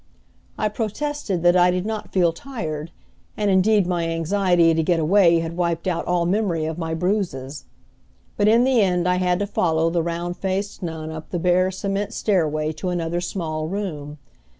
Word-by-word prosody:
I 215 Hz, -, +1 dB
protested 215 Hz, -, -3 dB
that 175 Hz, 0 st, +5 dB
I 180 Hz, 0 st, +5 dB
did 180 Hz, +1 st, -1 dB
not 215 Hz, -1 st, -4 dB
feel 175 Hz, -3 st, +2 dB
tired, 160 Hz, -, -5 dB, 0.5 s
and 205 Hz, -2 st, +1 dB
indeed 200 Hz, +1 st, +4 dB
my 175 Hz, -2 st, -1 dB
anxiety 170 Hz, 0 st, +2 dB
to 160 Hz, -, +1 dB
get 170 Hz, +1 st, +1 dB
away 170 Hz, 0 st, +4 dB
had 165 Hz, 0 st, -5 dB
wiped 170 Hz, -1 st, -1 dB
out 175 Hz, -2 st, -1 dB
all 175 Hz, -1 st, +1 dB
memory 180 Hz, -4 st, 0 dB
of 160 Hz, +1 st, -4 dB
my 160 Hz, -1 st, -2 dB
bruises. 160 Hz, -7 st, -2 dB, 0.7 s
But 205 Hz, -, +2 dB
in 230 Hz, +3 st, +5 dB
the 255 Hz, -3 st, +3 dB
end 180 Hz, -2 st, +1 dB
I 180 Hz, 0 st, +2 dB
had 180 Hz, -1 st, +1 dB
to 205 Hz, -, -1 dB
follow 165 Hz, -4 st, +1 dB
the 170 Hz, 0 st, +1 dB
round 170 Hz, +1 st, -3 dB
faced 195 Hz, +2 st, -3 dB
nun 160 Hz, -2 st, -5 dB
up 160 Hz, 0 st, -8 dB
the 175 Hz, -, -2 dB
bare, 180 Hz, +2 st, +2 dB
cement 200 Hz, +3 st, -3 dB
stairway 155 Hz, -6 st, 0 dB
to 160 Hz, +4 st, -4 dB
another 175 Hz, -1 st, -2 dB
small 160 Hz, -4 st, -3 dB
room. 155 Hz, -6 st, -5 dB
175 Hz, 180 wpm, -22 LUFS, 165-200 Hz, 0.7 s, that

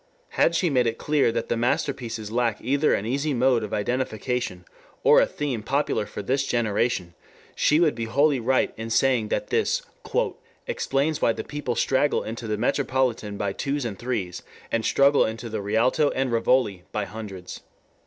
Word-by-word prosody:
Had 170 Hz, -, +2 dB
she 170 Hz, -1 st, +1 dB
made 125 Hz, -3 st, +3 dB
it 115 Hz, -, -1 dB
clear 150 Hz, -5 st, +2 dB
that -, -, -2 dB
the -, -, 0 dB
masterpieces 115 Hz, -2 st, -2 dB
lack 115 Hz, -2 st, 0 dB
either 140 Hz, +5 st, +1 dB
an 100 Hz, -, -3 dB
easy 140 Hz, +4 st, -1 dB
mode 125 Hz, -2 st, +3 dB
of 105 Hz, -, -5 dB
identification 120 Hz, -3 st, -2 dB, 0.4 s
or -, -, +7 dB
a -, -, +3 dB
theme 140 Hz, -7 st, -3 dB
popular 135 Hz, -2 st, 0 dB
for -, -, -6 dB
this 135 Hz, +6 st, +1 dB
generation, 110 Hz, -5 st, 0 dB, 0.4 s
she 150 Hz, -, +3 dB
would 165 Hz, -4 st, +4 dB
be 115 Hz, 0 st, -4 dB
wholly 140 Hz, +4 st, +2 dB
right 130 Hz, +3 st, +1 dB
in 110 Hz, +1 st, -5 dB
saying 120 Hz, -1 st, +2 dB
that -, -, -2 dB
this -, -, +1 dB, 0.8 s
"explains 140 Hz, +3 st, -1 dB
why 115 Hz, -, +3 dB
the -, -, -5 dB
people 145 Hz, -4 st, -4 dB
straggle 135 Hz, +2 st, +2 dB
into 115 Hz, +1 st, -6 dB
the 105 Hz, -1 st, -1 dB
Metropolitan 125 Hz, -3 st, 0 dB
by 100 Hz, -1 st, -2 dB
twos 140 Hz, +2 st, -2 dB
and 100 Hz, -5 st, -5 dB
threes 115 Hz, -8 st, -3 dB, 0.3 s
and 115 Hz, -1 st, 0 dB
struggle 140 Hz, +1 st, +4 dB
into 115 Hz, +1 st, -4 dB
the 110 Hz, -1 st, -3 dB
Rialto 115 Hz, +8 st, +2 dB
and 130 Hz, -1 st, 0 dB
Rivoli 115 Hz, -4 st, +2 dB
by 105 Hz, -1 st, -2 dB
hundreds. 100 Hz, -5 st, -8 dB
120 Hz, 175 wpm, -25 LUFS, 110-135 Hz, 0.8 s, or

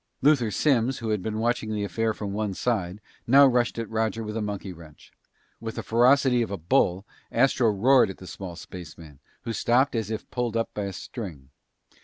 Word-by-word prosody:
Luther 135 Hz, -6 st, +4 dB
Simms, 130 Hz, +1 st, +1 dB
who 115 Hz, -1 st, -4 dB
had 105 Hz, -3 st, 0 dB
been 110 Hz, +2 st, -3 dB
watching 115 Hz, 0 st, 0 dB
the 105 Hz, -1 st, -2 dB
affair 115 Hz, +2 st, -1 dB
from 105 Hz, -2 st, -5 dB
one 105 Hz, -2 st, -2 dB
side, 100 Hz, -5 st, -1 dB, 0.3 s
now 140 Hz, +4 st, +8 dB
rushed 125 Hz, -3 st, +2 dB
at 115 Hz, -1 st, -3 dB
Roger 110 Hz, 0 st, -1 dB
with 105 Hz, 0 st, -5 dB
a 115 Hz, -, -1 dB
monkey 100 Hz, -2 st, -4 dB
wrench. 80 Hz, -3 st, -15 dB, 0.5 s
With 110 Hz, 0 st, -6 dB
the -, -, -4 dB
ferocity 125 Hz, +2 st, +4 dB
of 115 Hz, -, -1 dB
a 100 Hz, -, -3 dB
bull, 90 Hz, +3 st, +1 dB, 0.3 s
Astro 125 Hz, -1 st, +3 dB
roared 120 Hz, +6 st, +4 dB
at 95 Hz, -, -7 dB
the 95 Hz, -, -12 dB
small 90 Hz, -1 st, -7 dB
spaceman, 80 Hz, -5 st, -11 dB, 0.2 s
who 115 Hz, -, -3 dB
stopped 125 Hz, +4 st, +2 dB
as 110 Hz, -2 st, -2 dB
if 110 Hz, 0 st, -5 dB
pulled 120 Hz, -2 st, -1 dB
up 115 Hz, -, -2 dB
by 105 Hz, -, -3 dB
a 100 Hz, -, -5 dB
string. 85 Hz, -, -8 dB
110 Hz, 200 wpm, -26 LUFS, 100-120 Hz, 0.5 s, now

